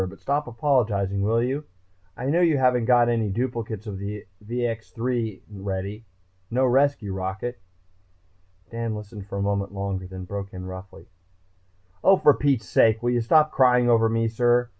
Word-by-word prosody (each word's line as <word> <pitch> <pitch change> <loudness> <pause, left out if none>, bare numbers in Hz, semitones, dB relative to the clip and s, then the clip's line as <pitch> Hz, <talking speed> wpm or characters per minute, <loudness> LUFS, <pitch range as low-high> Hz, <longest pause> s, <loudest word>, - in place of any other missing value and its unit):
But 95 - -13
stop 145 +1 -1
apologizing, 115 -6 0
will 115 +3 +2
you? 135 +4 -2 0.5
I 125 - -5
know 160 +6 +2
you 165 -4 +4
haven't 125 -3 +2
got 120 -1 +5
any 115 -3 +1
duplicates 115 -1 -3
of 100 -2 -5
the 100 +1 -6 0.2
VX 115 -1 -3
3 115 -4 -2
ready, 100 +2 -5 0.4
no 130 +3 +2
rescue 130 -5 +2
rocket...." 95 +4 -4 1.1
Dan 115 -1 -3
listened 105 -1 -9
a 100 - -3
moment 100 0 -1
longer 95 -1 -3
then 95 0 -8
broke 100 +1 -6
in 90 0 -7
roughly. 95 +1 -9 1.0
"Oh, 195 - +6
for 145 - +6
Pete's 135 -7 0
sake, 110 0 +3
will 120 - +2
you 120 -1 +1
stop 155 +6 +4
crying 125 -2 +4
over 115 -1 +4
me, 115 0 +1
sir? 120 +1 +2
115 Hz, 160 wpm, -24 LUFS, 100-125 Hz, 1.1 s, Oh